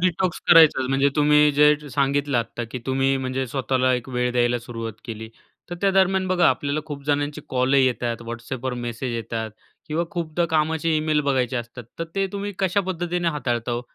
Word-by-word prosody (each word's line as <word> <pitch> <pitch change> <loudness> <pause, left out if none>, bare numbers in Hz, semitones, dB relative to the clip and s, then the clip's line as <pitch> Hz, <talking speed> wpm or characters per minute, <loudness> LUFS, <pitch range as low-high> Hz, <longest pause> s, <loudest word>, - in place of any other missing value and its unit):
Detox 180 0 0
करायचाच. 160 -6 +7
म्हणजे 135 +1 +3
तुम्ही 150 0 +5
जे 150 +1 +5 0.2
सांगितलं 140 0 +1
आत्ता, 120 +1 -4
की 115 +3 -7
तुम्ही 135 +1 +1
म्हणजे 130 0 -2
स्वतःला 130 0 0
एक 125 +1 -5
वेळ 125 -1 -1
द्यायला 120 0 +2
सुरुवात 115 -1 -6
केली. 110 -1 -7 0.4
तर 175 - -3
त्या 200 - +3
दरम्यान 190 0 +2
बघा, 180 -2 +4
आपल्याला 140 +4 -1
खूप 145 -2 -7
जणांचे 145 +1 -1
कॉलही 130 +1 +3
येतात, 120 -2 -2
WhatsAppवर 120 +2 -4
मेसेज 120 +1 -4
येतात 115 -1 -4 0.4
किंवा 160 +3 0
खूपदा 170 0 -2
कामाचे 160 +1 +1
ईमेल 155 0 +1
बघायचे 130 -1 0
असतात. 120 +1 -6
तर 165 - -2
ते 195 0 +1
तुम्ही 200 0 -4
कशा 195 +1 +1
पद्धतीने 175 -1 -1
हाताळता 120 -6 -2
हो? 120 - -1
135 Hz, 175 wpm, -23 LUFS, 125-160 Hz, 0.4 s, करायचाच